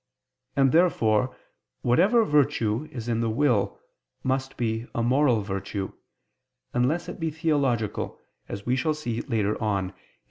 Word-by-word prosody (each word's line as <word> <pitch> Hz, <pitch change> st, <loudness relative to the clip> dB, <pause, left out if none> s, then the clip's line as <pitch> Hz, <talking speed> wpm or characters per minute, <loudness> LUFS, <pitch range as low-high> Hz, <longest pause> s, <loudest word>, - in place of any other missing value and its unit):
And 135 Hz, -1 st, +4 dB
therefore 130 Hz, -9 st, +3 dB, 0.5 s
whatever 195 Hz, -, +4 dB
virtue 140 Hz, -, +1 dB
is 120 Hz, -4 st, -6 dB
in 115 Hz, -1 st, 0 dB
the 115 Hz, -, +1 dB
will 120 Hz, -2 st, +1 dB, 0.4 s
must 130 Hz, 0 st, -1 dB
be 115 Hz, 0 st, -1 dB
a 115 Hz, -, +1 dB
moral 125 Hz, -2 st, +3 dB
virtue, 95 Hz, 0 st, -4 dB, 0.8 s
unless 135 Hz, +8 st, +1 dB
it -, -, -7 dB
be 165 Hz, -1 st, 0 dB
theological, 140 Hz, -, 0 dB, 0.3 s
as 100 Hz, 0 st, -6 dB
we 125 Hz, -, +2 dB
shall 155 Hz, +3 st, 0 dB
see 120 Hz, -6 st, -3 dB
later 110 Hz, -5 st, -1 dB
on 100 Hz, -4 st, 0 dB
(Q. 95 Hz, -, -29 dB
125 Hz, 140 wpm, -26 LUFS, 110-145 Hz, 0.8 s, And